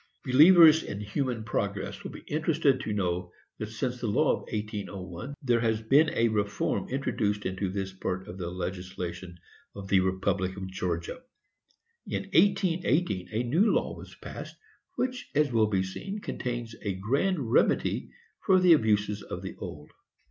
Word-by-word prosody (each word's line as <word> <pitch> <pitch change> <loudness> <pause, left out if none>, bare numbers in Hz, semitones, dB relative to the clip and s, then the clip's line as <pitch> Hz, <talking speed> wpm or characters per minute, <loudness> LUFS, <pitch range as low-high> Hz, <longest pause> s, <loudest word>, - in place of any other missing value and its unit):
Believers 160 +4 +8
in 100 -8 -6
human 115 +3 -2
progress 100 -2 -3
will - - -5
be - - -10
interested 155 -3 +1
to - - -4
know 90 -3 -1 0.3
that 110 - -3
since 120 +3 -3
the 120 - -1
law 105 - +3
of - - 0
1801 100 +1 -5
there 120 -3 +3
has 110 -1 +1
been 135 +8 +4
a 115 - +3
reform 100 -2 -1
introduced 105 -6 -1
into 95 +1 -2
this 95 0 -4
part 95 0 -4
of 95 -1 -8
the 85 -2 -3
legislation 90 -1 -5 0.4
of 95 -1 -8
the 95 - +5
republic 95 0 0
of 95 - -5
Georgia. 90 - -3 0.9
In - - -2
1818, 175 - +2
a 110 +3 0
new 165 - +3
law - - 0
was - - -12
passed, - - -9 0.4
which, 255 0 -3
as 150 -2 +3
will 110 -2 +3
be 95 -3 +1
seen, 195 - -5
contains 120 - -4
a 100 -3 -2
grand 135 - 0
remedy - - +2 0.3
for 190 -1 +5
the 180 -2 +7
abuses 105 -6 +2
of - - -7
the - - -6
old. 75 0 -8
105 Hz, 160 wpm, -28 LUFS, 95-140 Hz, 0.9 s, Believers